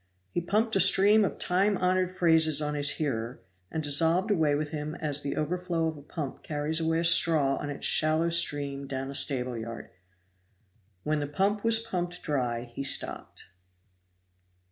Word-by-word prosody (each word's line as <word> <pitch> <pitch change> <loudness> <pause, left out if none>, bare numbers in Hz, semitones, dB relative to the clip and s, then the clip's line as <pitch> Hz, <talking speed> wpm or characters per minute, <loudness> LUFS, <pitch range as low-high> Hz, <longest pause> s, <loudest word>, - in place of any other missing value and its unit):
He 175 - -2
pumped 215 +6 0
a - - +3
stream 205 +3 +5
of 195 - -2
time 195 +3 +1
honored 185 0 0
phrases 160 -4 +3
on 150 -1 -3
his 145 -1 +2
hearer, 120 -5 -3 0.3
and 160 - -4
dissolved 165 +7 +1
away 155 -7 +2
with 150 0 -3
him 155 0 -5
as 145 -3 -3
the 140 - -4
overflow 170 +1 -2
of 160 -1 -2
a 145 - -12
pump 145 -1 -7
carries 150 +1 -3
away 160 0 0
a 165 - 0
straw 160 -4 +4
on 145 - -5
its 145 - -4
shallow 155 +2 +2
stream 145 -4 0
down 135 0 -5
a - - -8
stable 130 -3 0
yard. 115 0 -8 1.1
When 155 0 -1
the 145 - -3
pump 195 +8 -1
was 230 -1 +5
pumped 180 -5 -4
dry 125 -5 -2
he 120 +2 -8
stopped. 135 -8 0
155 Hz, 170 wpm, -27 LUFS, 145-175 Hz, 1.1 s, stream